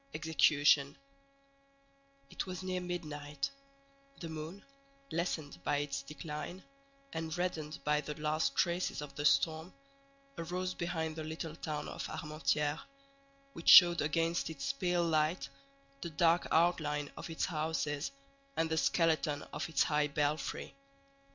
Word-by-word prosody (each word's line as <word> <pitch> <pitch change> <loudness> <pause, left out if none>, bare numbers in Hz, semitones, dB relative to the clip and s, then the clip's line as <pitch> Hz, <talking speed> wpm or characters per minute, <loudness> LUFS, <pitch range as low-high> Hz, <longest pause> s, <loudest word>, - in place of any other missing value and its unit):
EXECUTION 150 -3 +4 1.3
It - - -4
was 185 0 -5
near 185 -1 -2
midnight; 150 -5 -4 0.7
the 165 - -6
moon, 160 +5 -7 0.5
lessened 160 - -2
by 145 - +1
its 140 -1 -2
decline, 150 +4 -7 0.5
and 160 +1 -3
reddened 160 -4 -2
by 150 0 +2
the 150 0 -6
last 150 -2 0
traces 175 -3 0
of 140 -1 -9
the 145 +1 -4
storm, 160 +3 +3 0.7
arose 180 +2 -2
behind 160 -2 -2
the 160 - -5
little 160 0 -5
town 155 -2 -4
of - - -5
Armentières, 150 0 -1 0.7
which 165 - 0
showed 175 -1 +10
against 165 +3 0
its 160 - -3
pale 180 -8 +1
light 155 0 +1 0.5
the 170 - -4
dark 165 +2 +3
outline 155 -3 +2
of - - -7
its 160 - -1
houses, 155 - -2 0.5
and 165 0 +1
the 160 - +1
skeleton 160 -4 +2
of 150 +3 -3
its 160 - +3
high 150 -1 +2
belfry. 150 +1 -1
160 Hz, 130 wpm, -33 LUFS, 150-170 Hz, 1.3 s, showed